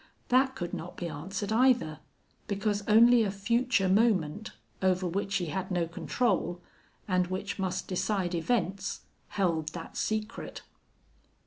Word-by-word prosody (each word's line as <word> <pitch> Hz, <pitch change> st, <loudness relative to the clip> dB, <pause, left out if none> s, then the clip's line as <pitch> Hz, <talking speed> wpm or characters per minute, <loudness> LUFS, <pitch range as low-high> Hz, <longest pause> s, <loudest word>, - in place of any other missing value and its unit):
That 260 Hz, +1 st, +3 dB
could 175 Hz, -8 st, -5 dB
not 170 Hz, -, -6 dB
be 175 Hz, -, -3 dB
answered, 190 Hz, +7 st, -4 dB
either, 235 Hz, -, +3 dB, 0.5 s
because 205 Hz, 0 st, 0 dB
only 235 Hz, +2 st, +7 dB
a 210 Hz, -, +1 dB
future 220 Hz, +2 st, +1 dB
moment, 200 Hz, -2 st, +2 dB, 0.3 s
over 185 Hz, -1 st, +2 dB
which 195 Hz, +2 st, -2 dB
he 180 Hz, -, +1 dB
had 190 Hz, 0 st, -3 dB
no 175 Hz, -2 st, +1 dB
control, 175 Hz, 0 st, -1 dB, 0.5 s
and 180 Hz, -2 st, +2 dB
which 190 Hz, +2 st, -4 dB
must 190 Hz, -1 st, -2 dB
decide 185 Hz, -1 st, -1 dB
events, 190 Hz, +1 st, -1 dB, 0.3 s
held 170 Hz, -6 st, 0 dB
that 165 Hz, -2 st, -8 dB
secret. 215 Hz, +1 st, -3 dB
195 Hz, 130 wpm, -29 LUFS, 180-215 Hz, 0.5 s, only